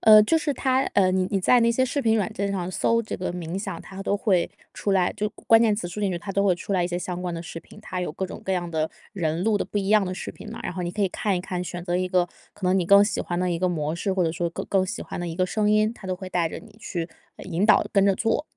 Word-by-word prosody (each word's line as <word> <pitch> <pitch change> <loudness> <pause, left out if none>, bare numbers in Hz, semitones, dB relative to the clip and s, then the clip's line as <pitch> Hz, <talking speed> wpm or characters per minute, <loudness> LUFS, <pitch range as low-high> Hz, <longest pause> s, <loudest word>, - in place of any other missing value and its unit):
呃， 215 -1 +9
就 325 - +3
是 300 -2 0
它 260 -1 +1
呃， 185 -2 +4
你 185 -1 +1
你 195 -2 +1
在 245 +6 +5
那 230 - +4
些 260 +3 +2
视 280 +2 -1
频 225 -1 +3
软 215 +1 -1
件 200 -2 -2
上 185 -2 -2
搜 230 +5 +2
这 225 - -5
个 185 - -3
冥 175 0 -5
想， 195 -4 -4
它 195 0 -8
都 200 - +1
会 190 -4 +1 0.2
出 205 - -2
来 185 -2 +2
就 210 +1 -2
关 - - -19
关 225 0 +7
键 215 -2 +3
词 205 - -3
输 180 +5 -6
进 200 -2 +1
去， 175 - -2
它 195 +1 -6
都 200 +1 +2
会 185 -3 +4
出 200 - -5
来 185 - +2
一 175 - 0
些 175 0 -2
相 180 0 -4
关 180 - -2
的 165 - -4
视 165 -1 -7
频。 - - -16
它 185 -4 -4
有 180 - -2
各 190 +2 -3
种 - - -9
各 190 - -1
样 175 -2 -1
的 160 -1 -1 0.2
人 170 -2 -1
录 220 -1 +3
的 - - -1
不 205 - -3
一 195 - -2
样 210 -2 +5
的 185 - -3
视 - - -6
频 - - -10
嘛， - - -7
然 - - -2
后 180 - -4
你 175 - -2
可 210 - -5
以 195 - +3
看 195 0 -1
一 - - -2
看， 180 -1 -3
选 175 0 -6
择 175 -1 0
一 185 0 0
个 180 -1 +2 0.3
可 185 - -4
能 185 - +3
你 175 - +1
更 200 +3 +7
喜 210 - -1
欢 175 - -3
的 180 0 +1
一 170 - -1
个 185 - +2
模 155 -2 -1
式， 190 +3 -1
或 185 -2 +1
者 160 - 0
说 170 +1 -2
更 - - -5
更 190 -1 +2
喜 210 +6 -4
欢 - - -6
的 175 - -3
一 165 - -5
个 185 -1 +2
声 210 +2 +1
音， 215 +1 +3
它 195 - -11
都 185 - -1
会 185 0 -7
带 175 -3 +1
着 - - -6
你 215 -1 -16
去， 175 -6 -4 0.3
呃， - - -10
引 175 +5 0
导、 215 - +5
跟 195 -1 +4
着 195 - +4
做。 225 +6 +1
190 Hz, 355 characters per minute, -25 LUFS, 175-210 Hz, 0.3 s, 呃